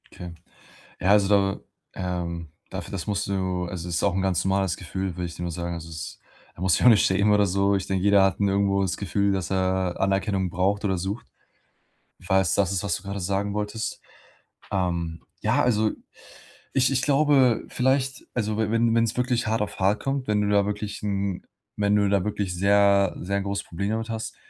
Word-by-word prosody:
Tja. 90 -1 -9 0.7
Ja, 95 - 0
also 100 -1 +5
da, 100 -1 +2 0.3
ähm, 85 -3 -4 0.2
dafür - - -6
das 95 -4 -5
musst 105 -1 -1
du 95 -2 -1
also 90 -1 -6
es 85 - -2
ist - - 0
auch 100 -3 +2
'n 95 - 0
ganz 95 -3 +1
normales 95 -2 +1
Gefühl, 95 +1 -4
will 90 - -2
ich 85 -1 -7
dir 85 - -6
nur 85 - -3
sagen. 85 +1 -4
Also, 85 0 -8
es 80 -1 -7 0.4
da - - -12
musst 90 -2 +3
du - - -2
dich - - +1
auch - - +10
nicht 105 - +5
schämen 100 +2 +3
oder 105 0 +4
so. 100 +2 +2
Ich 95 -1 -2
denke, 95 -1 -1
jeder 100 -1 +5
hat, 95 -2 +1
ne, 100 -1 +2
irgendwo 100 0 +2
das 95 -2 -1
Gefühl, 100 +1 0
dass 95 -2 -2
er 95 -1 0
Anerkennung 95 -1 0
braucht 95 +4 0
oder 95 -2 +1
sucht. 95 +6 -4 1.0
Falls 95 -1 +2
es - - +2
das 100 -2 +2
ist, 95 - -1
was 95 -4 0
du - - -10
gerade 100 0 -4
sagen 100 +2 -1
wolltest. 105 +2 -3 0.7
Ähm, 85 -3 -2 0.2
ja, - - +2
also 110 -3 +2 0.8
ich 130 0 +3
ich 130 -1 +1
glaube 140 -4 +3
vielleicht 130 +1 0
also, 110 -3 -1
we 110 -1 0
wenn 115 0 +2
wenn's 115 -1 +1
wirklich 125 -1 0
hart 110 0 +1
auf 105 - -5
hart 100 +3 +2
kommt, 135 -1 -2
wenn 105 -1 +2
du 105 - 0
da 100 -1 +3
wirklich 105 0 -4
'n 100 -2 -2 0.3
wenn 105 0 +2
du 100 -1 +3
da 100 -2 +2
wirklich 100 -4 -2
sehr 100 0 +3
sehr 100 +2 -1
'n 100 - -3
großes 100 0 -3
Problem 100 +4 -3
damit 110 +1 -2
hast, 110 0 -5
100 Hz, 215 wpm, -25 LUFS, 95-105 Hz, 1.0 s, auch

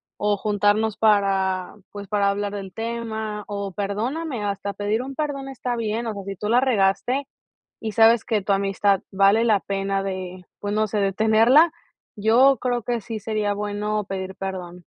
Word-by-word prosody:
o 205 0 0
juntarnos 205 +1 +1
para 195 -3 +1 0.2
pues 205 -1 -8
para 205 -1 +2
hablar 200 0 -2
del 195 -2 -6
tema 225 -2 -4
o 200 -2 -4
perdóname". 225 - -3
Hasta 200 0 -3
pedir 205 +3 -1
un 270 +2 -6
perdón 275 -2 -3
está 250 -2 -3
bien. 230 0 -2
O 220 - -2
sea, 200 -1 -7
si 195 0 -6
tú 210 - -4
la 240 +3 +4
regaste 255 +3 +1 0.5
y 220 -2 -4
sabes 225 0 +5
que 215 -2 0
tu 200 - -2
amistad 195 0 +2
vale 200 +4 +4
la 210 -4 +3
pena 195 0 -2
de, 185 -1 -5
pues 205 0 -3
no 215 +1 +2
sé, 210 - -3
de 195 -1 +1
tenerla, 225 - +5 0.5
yo 245 +6 +5
creo 245 -2 -1
que 240 +1 -1
sí 220 +1 -6
sería 215 -1 -1
bueno 210 +1 -2
pedir 190 -1 -5
perdón. 180 -2 -6
210 Hz, 175 wpm, -23 LUFS, 195-225 Hz, 0.5 s, sabes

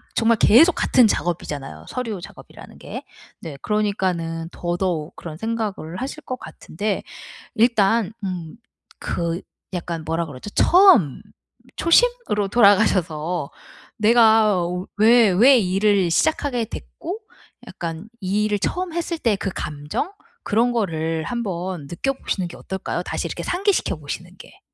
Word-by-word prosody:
정말 225 0 +3
계속 305 +14 +6
같은 250 - +4
작업이잖아요 155 -7 -3
서류 230 -6 -4
작업이라는 - - -13
게. - - -7 0.4
네 155 -5 -7
그러니까는 185 -6 -1
더더욱 175 -2 -2
그런 160 -2 -8
생각을 215 -6 -4
하실 275 +4 -5
것 255 -2 -5
같은데 205 +4 -4 0.5
일단 225 -2 +3
음 180 -5 -5 0.5
그 170 +1 -2 0.3
약간 170 -2 -4
뭐라 165 +1 -1
그러죠? 145 +5 -9
처음 345 - +5 0.6
초심으로 335 - +2
돌아가셔서 180 -7 +2 0.5
내가 220 -2 +5 0.4
왜 225 -1 +6
왜 255 +9 +6
일을 195 -1 +2
시작하게 250 - +1
됐고 350 - -7 0.5
약간 170 +5 -6
이 200 +3 0
일을 210 -1 0
처음 360 - -2
했을 340 0 -2
때 225 -7 +2
그 195 - -3
감정? 150 - -4 0.3
그런 230 +4 +2
거를 165 -7 -1
한번 185 -8 -4
느껴 175 - -1
보시는 190 -8 -3
게 - - -10
어떨까요? 190 0 -4
다시 - - -3
이렇게 - - -5
상기시켜 390 +2 0
보시는 175 +5 -7
게. - - -15
200 Hz, 280 characters per minute, -22 LUFS, 170-235 Hz, 0.6 s, 계속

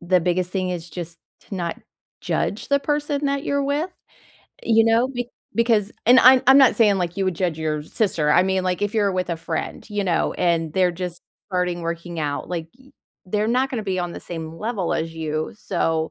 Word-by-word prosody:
the 180 +1 +2
biggest 180 +1 0
thing 185 -1 -1
is 175 -1 -5
just 170 0 -7 0.2
to - - -9
not 170 -2 -3 0.4
judge 205 - -2
the 280 0 +3
person 295 0 -1
that 280 0 0
you're 280 0 0
with, 295 +6 -1 0.7
eh, - - -11
you 225 -1 +5
know? 230 +3 +3
Be 245 -2 -4 0.3
because 225 -3 +2
and 250 +2 +8
I'm 255 0 +7
I'm 270 +1 +9
not 265 -3 +6
saying, 210 -4 +4
like, 175 0 -2
you 195 - 0
would 185 -1 0
judge 175 -3 -1
your 155 -1 -2
sister, 160 -5 +1
I 180 - +6
mean, 190 0 0
like, 185 +1 -1
if 205 +2 -1
you're 205 -3 +2
with 185 -1 -2
a 170 - -1
friend, 165 +3 -5
you 205 -1 -1
know, 180 -4 +1
and 165 -3 0
they're 185 0 +3
just 175 0 -6 0.3
starting 180 -2 -1
working 170 0 -4
out, 145 -2 -3
like, 170 -3 -3 0.6
they're 210 +3 0
not 255 +3 +1
gonna 225 -5 -3
be 185 -2 -1
on 175 -1 -3
the - - -7
same 160 -2 -7
level 210 -4 -2
as 165 0 -2
you, 155 -1 -3
so, 165 -5 -1
185 Hz, 210 wpm, -22 LUFS, 170-225 Hz, 0.7 s, I'm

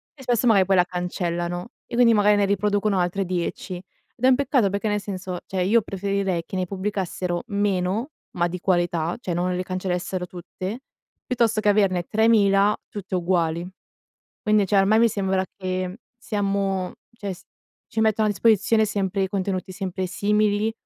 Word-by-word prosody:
e 270 - -13
spesso 245 0 +1
magari 200 -5 +5
poi, 190 0 +3
la 180 - +6
cancellano 175 0 -3 0.2
e - - -15
quindi 235 -1 +5
magari, 210 0 +4
ne 205 - +3
riproducono 205 0 +1
altre 180 +2 0
10. 180 0 -3
Ed 190 +6 -8
è - - +7
un 260 - +6
peccato 255 -6 +2
perché, 200 +2 -1
nel 210 0 +1
senso, 185 -2 -5
cioè 190 -1 -2
io 220 +5 +4
preferirei 195 -3 -1
che 180 - -8
ne 185 -1 0
pubblicassero 185 -2 -3
meno, 200 +3 0 0.3
ma 175 0 +2
di 180 +1 -5
qualità, 175 -2 0
cioè 180 -8 -3
non 180 +1 0
le 180 - -1
cancellassero 185 0 -3
tutte, 185 +5 -6 0.4
piuttosto 230 -3 +1
che 210 - +3
averne 195 -3 +3
3000 210 -2 +4
tutte 205 -2 -8
uguali. 170 -2 0 0.8
Quindi 215 -1 +4
cioè, 200 - +3
ormai 205 +3 +4
mi 235 - +5
sembra 190 -2 0
che 185 +1 -3 0.2
siamo 195 -4 -1 0.2
cioè 205 -4 -5
si 185 - -17 0.5
ci 220 - -2
mettono 220 -1 +3
a - - +2
disposizione 220 +1 +3
sempre, 195 -2 -1
contenuti 190 -1 -2
sempre 190 -1 -3
simili 210 +2 +1
195 Hz, 165 wpm, -24 LUFS, 180-210 Hz, 0.8 s, è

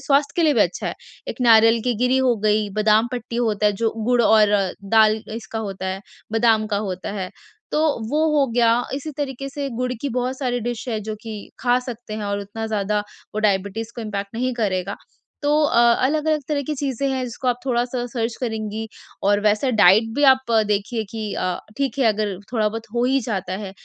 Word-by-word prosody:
स्वास्थ्य 285 0 +2
के 340 - +3
लिए 300 -3 +4
भी 220 - +3
अच्छा 175 - 0
है। - - -3 0.3
एक - - -4
नारियल 225 0 +6
की 245 -2 +1
गिरी 255 +1 +3
हो 255 -2 +3
गई, 210 0 +2
बादाम 215 +2 +3
पट्टी 240 -1 -4
होता 215 -3 +1
है, 205 - +3
जो 225 +3 0 0.2
गुड़ 245 -1 +3
और 215 -1 +5 0.4
दाल 215 +1 +4
अ, - - -7
इसका 225 0 -6
होता 195 -3 -4
है, 190 +1 -3 0.3
बादाम 225 -1 +3
का - - +2
होता 185 +2 -4
है, 185 - -4 0.4
तो 310 +1 +3 0.2
वो 310 +2 +2
हो 275 - +4
गया 235 0 +4
इसी 285 +3 -5
तरीके 275 -1 -3
से 280 0 -4
गुड़ 250 0 -1
की 285 - -1
बहुत 255 +1 -2
सारी 245 -3 -1
डिश 240 +2 -4
है 220 -3 -1
जो 215 +1 -5
कि 215 -2 -8
खा 245 0 +3
सकते 240 -3 -7
हैं 215 -1 -4
और 200 0 -2
उतना 220 +3 -5
ज़्यादा 210 -1 0 0.3
वो - - -2
डायबिटीज 205 +2 0
को 235 - -4
इम्पैक्ट 200 -1 -5
नहीं 250 +1 -1
करेगा। 190 -6 -1 0.5
तो 290 - +1
अ 235 -5 +3 0.2
अलग-अलग 305 +2 +1
तरह 290 -2 0
की 300 +3 -3
चीज़ें 275 -1 -2
हैं, 260 -1 -1
जिसको 250 +2 -4
आप 245 0 +1
थोड़ा-सा 245 -1 -1
सर्च 230 -2 -2
करेंगी 220 -2 -3 0.4
और 205 +1 +3
वैसा 215 +5 +2
डाइट 215 +1 +5
भी 290 - 0
आप 260 -2 +1 0.2
देखिए 210 +2 -1
कि 220 -2 -4
अ, 180 -1 -1 0.2
ठीक 275 -2 -1
है 260 - +3
अगर 210 -3 0 0.2
थोड़ा-बहुत 225 -1 -1
हो 240 +1 +2
ही 265 +1 +2
जाता 195 -5 -3
है 195 - -6
225 Hz, 210 wpm, -22 LUFS, 210-255 Hz, 0.5 s, नारियल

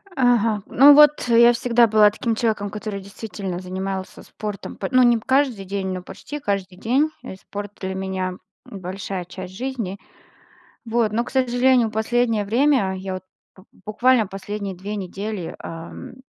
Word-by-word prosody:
Ага, 230 -5 +2
ну, 280 +3 +7
вот, 295 0 +7
я 235 +1 +7
всегда 235 0 +3
была 215 -1 +6
таким 230 +1 -2
человеком, 215 -3 -1
который 210 -1 -5
действительно 195 -2 -6
занимался 190 +1 -5
спортом, 210 -2 -7
по 195 - -4
ну, 255 0 +5
не 240 -1 +5
п 220 - -9
каждый 260 -7 +1
день, 195 0 -3
но 185 - -5
почти 295 +9 -8
каждый 195 -6 -3
день, 265 +9 +1
и - - -7
спорт 205 +1 -8
для 190 0 -4
меня- 190 -1 -3 0.3
большая 190 -1 -6
часть 185 +1 -9
жизни. 235 -5 -4 0.9
Вот, 225 -2 +1
но, 230 +2 0
к - - -9
сожалению, 250 -2 +3
последнее 225 -1 +1
время, 235 -3 +2
я, 190 0 -5
вот, 185 - -7 0.3
б 185 - -16 0.2
буквально 230 0 +3
последние 195 0 -5
2 200 +4 -6
недели, 195 -1 -5
э, 165 +7 -8
210 Hz, 160 wpm, -22 LUFS, 190-240 Hz, 0.9 s, ну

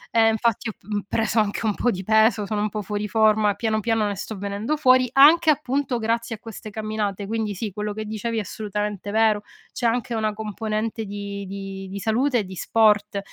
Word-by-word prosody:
e 225 -1 +6
infatti 225 0 0
ho - - -3
p - - -36
mhmm, 205 -1 -2
preso 220 0 +1
anche 210 +1 0
un 215 - +2
po' 245 - 0
di 190 -4 -2
peso, 220 +1 +3
sono 210 0 -2
un 215 - 0
po' 210 0 -4
fuori 210 +1 -3
forma, 215 0 +3
piano 220 -1 0
piano 225 0 +1
ne 205 -1 -2
sto 210 +2 -6
venendo 200 +9 -2
fuori, 255 -3 +4
anche, 310 +4 +7
appunto, 275 -3 +1
grazie 230 +1 -1
a - - -16
queste 220 -1 -9
camminate, 215 -2 -3
quindi 215 -1 -2
sì, 210 +2 -4
quello 210 +2 -4
che 215 +1 -5
dicevi 220 +2 -3
è - - +1
assolutamente 210 -1 -4
vero. 215 0 +3 0.3
C'è 240 - -1
anche 240 +1 -1
una 220 -1 0
componente 220 +1 -3
di 200 0 -6
di 195 0 -6
di 195 - -6
salute 240 +5 +1
e - - -1
di 190 -1 -9
sport 210 +1 +2
215 Hz, 210 wpm, -23 LUFS, 205-225 Hz, 0.3 s, anche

